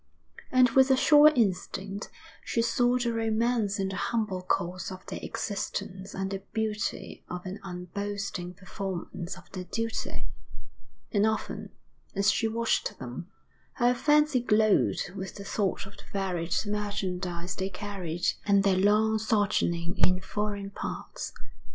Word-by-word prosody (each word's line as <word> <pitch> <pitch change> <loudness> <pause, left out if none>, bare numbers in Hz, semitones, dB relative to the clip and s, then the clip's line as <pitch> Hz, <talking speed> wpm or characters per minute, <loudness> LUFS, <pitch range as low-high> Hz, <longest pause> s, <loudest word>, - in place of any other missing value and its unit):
And 255 -2 +6
with 265 +1 +6
a 265 - +5
sure 295 +2 +8
instinct 195 -2 -1 0.3
she 230 - +1
saw 245 +2 +3
the 240 -2 0
romance 225 -2 +1
in 195 0 0
the 195 - -4
humble 215 -6 -1
course 180 0 -1
of 185 0 -9
their 195 - -5
existence 195 -2 -4
and 195 0 -2
the 195 - -2
beauty 220 -1 -2
of 180 +1 -5
an 190 +3 -5
unboasting 190 0 -4
performance 190 -1 -5
of 185 - -16
their 185 -1 -5
duty; 230 +4 -3 0.9
and 205 0 +4
often, 220 0 -2 0.5
as 200 +2 +4
she 225 - +1
watched 230 +1 0
them, 130 +7 -7 0.4
her 245 -1 +3
fancy 295 +1 +4
glowed 215 -4 +3
with 190 -2 -5
the 200 - -7
thought 195 -1 -1
of 195 +1 -13
the - - -12
varied 180 -4 -1
merchandise 185 -4 -2
they 190 0 -2
carried, 180 -3 -4 0.2
and 200 -1 +4
their 195 -2 +3
long 215 +3 +4
sojourning 200 -5 +1
in 185 0 +4
foreign 205 0 -3
parts. - - -5
200 Hz, 140 wpm, -29 LUFS, 185-220 Hz, 0.9 s, sure